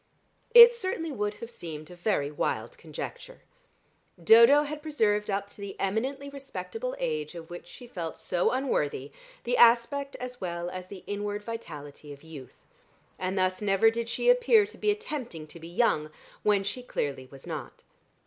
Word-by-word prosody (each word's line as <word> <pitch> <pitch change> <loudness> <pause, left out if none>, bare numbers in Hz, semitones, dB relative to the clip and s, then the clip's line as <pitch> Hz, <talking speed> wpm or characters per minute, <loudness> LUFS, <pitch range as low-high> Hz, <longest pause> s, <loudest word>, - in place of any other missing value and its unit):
It 475 0 +12
certainly 375 -8 -3
would 210 -5 -2
have 230 +2 -8
seemed 155 -5 -8
a - - -10
very 175 -6 0
wild - - -2
conjecture. - - -8 0.8
Dodo 235 - +8
had 300 0 -5
preserved 215 -10 0
up 200 0 -1
to - - -13
the 200 -1 -7
eminently 260 +8 -1
respectable 285 - -6
age 465 - -3
of 165 0 -9
which 175 0 -8
she 245 - -12
felt 175 -9 -6
so 175 - 0
unworthy, 150 - -1 0.3
the 245 +1 0
aspect 245 +4 +4
as 250 0 -7
well 175 -1 -3
as 185 0 -7
the 195 -2 -10
inward 205 0 -3
vitality 150 -10 -8
of 140 +1 -12
youth, 155 -5 -12 0.5
and 185 +1 -2
thus 185 +1 +1
never 205 +2 +4
did 230 0 -3
she 485 - -2
appear 480 -3 +6
to 420 - -14
be 425 - +1
attempting 290 - -3
to 155 +2 -11
be 165 - -9
young, 170 -5 +1 0.3
when 205 -2 +3
she 205 +6 -4
clearly 140 - -3
was 135 -1 -13
not. 155 -7 -7
210 Hz, 165 wpm, -28 LUFS, 175-280 Hz, 0.8 s, It